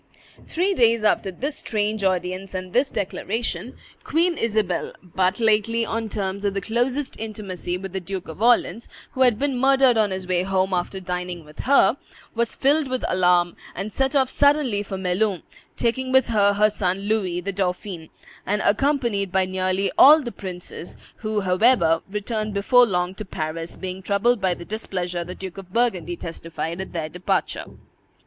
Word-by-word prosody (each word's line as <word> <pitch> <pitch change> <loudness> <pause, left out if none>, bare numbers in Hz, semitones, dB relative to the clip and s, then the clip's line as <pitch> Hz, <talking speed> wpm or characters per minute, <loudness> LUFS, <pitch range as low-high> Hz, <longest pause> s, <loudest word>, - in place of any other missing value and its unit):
Three 370 +4 +1
days 230 - +3
after 210 -2 +2
this 275 - -4
strange 210 -1 -1
audience 185 +1 -1
and 185 0 -5
this 265 +3 +3
declaration, 220 +4 -3 0.3
Queen 340 +2 +2
Isabel, 210 - -1
but 185 +3 0
lately 225 +1 +2
on 225 -1 -3
terms 200 -1 -3
of 200 -1 0
the - - +1
closest 245 +7 -1
intimacy 200 -5 -4
with 190 0 -8
the 190 - -1
Duke 190 0 -6
of 160 +5 -9
Orleans, 235 -1 +2 0.2
who 260 - -4
had 245 -4 +5
been 275 -1 -1
murdered 265 -2 +4
on 210 -2 +3
his 190 -1 -4
way 180 -1 +1
home 190 0 0
after 180 +2 -2
dining 180 -2 -4
with 150 +1 -16
her, 275 +1 +4 0.4
was 235 0 -1
filled 285 +2 +2
with 255 -1 -2
alarm, 180 -1 +3 0.2
and 195 +3 -5
set 270 +2 0
off 265 -2 +4
suddenly 285 -7 +3
for 195 -1 -5
Melun, 190 0 0 0.3
taking 255 +2 0
with 265 -2 +4
her 205 -3 +4
her 210 +1 +3
son 190 -2 -1
Louis, 200 -4 0
the 200 +3 -3
dauphin, 180 -3 -3 0.3
and 205 +2 0
accompanied 230 -4 +1
by 190 0 +2
nearly 185 +1 0
all 300 +2 +9
the 240 - -4
princes, 180 -3 -8 0.2
who, 215 -2 -2
however, 180 -3 +3
returned 215 +1 -3
before 245 +5 +5
long 180 -2 -1
to 205 - -7
Paris, 165 -2 -4
being 185 0 -6
troubled 205 +4 +1
by 185 -2 +1
the 170 - -10
displeasure 180 -4 -3
the 180 +2 -8
Duke 190 0 -7
of 185 -2 -12
Burgundy 205 -7 0
testified 165 +1 -5
at 190 - -7
their 160 -3 -3
departure. 180 +2 -1
200 Hz, 170 wpm, -23 LUFS, 185-235 Hz, 0.4 s, all